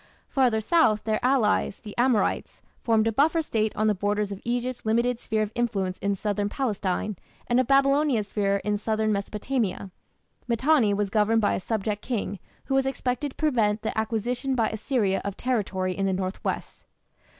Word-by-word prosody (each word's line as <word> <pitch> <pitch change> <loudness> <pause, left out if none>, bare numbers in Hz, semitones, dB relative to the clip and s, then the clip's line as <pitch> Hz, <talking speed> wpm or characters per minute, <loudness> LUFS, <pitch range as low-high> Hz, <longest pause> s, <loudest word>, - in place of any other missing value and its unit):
Farther 245 -5 +2
south, 220 -6 +3
their 220 +1 -1
allies, 250 -6 +2
the 210 -2 -10
Amorites, 245 -3 0 0.2
formed 225 -2 +2
a 225 - +2
buffer 315 +8 +2
State 220 -6 0
on 215 - 0
the 215 - +4
borders 205 +1 -1
of 200 - -6
Egypt's 245 +1 -2
limited 235 +2 +1
sphere 215 -2 -1
of 210 - -4
influence 195 -6 -1
in 200 0 0
southern 205 0 -1
Palestine, 205 -5 -2 0.3
and 240 +1 +2
of 255 - +1
Babylonia's 275 -5 +3
sphere 200 -1 +1
in 210 0 0
southern 215 0 0
Mesopotamia. 205 -1 -2 0.6
Mitanni 250 -1 +3
was 200 -1 -1
governed 220 +2 +3
by 205 - +2
a - - -1
subject 210 +1 -2
king 205 -5 -3 0.3
who 270 - -2
was 270 0 +2
expected 265 +1 -2
to - - -16
prevent 225 -8 +1
the 220 - -2
acquisition 240 +4 -1
by 230 -3 +2
Assyria 220 -3 0
of 200 -1 -4
territory 190 -7 -1
in 195 0 0
the 190 - +1
north 185 +1 -3
west. - - -4
220 Hz, 175 wpm, -26 LUFS, 205-250 Hz, 0.6 s, the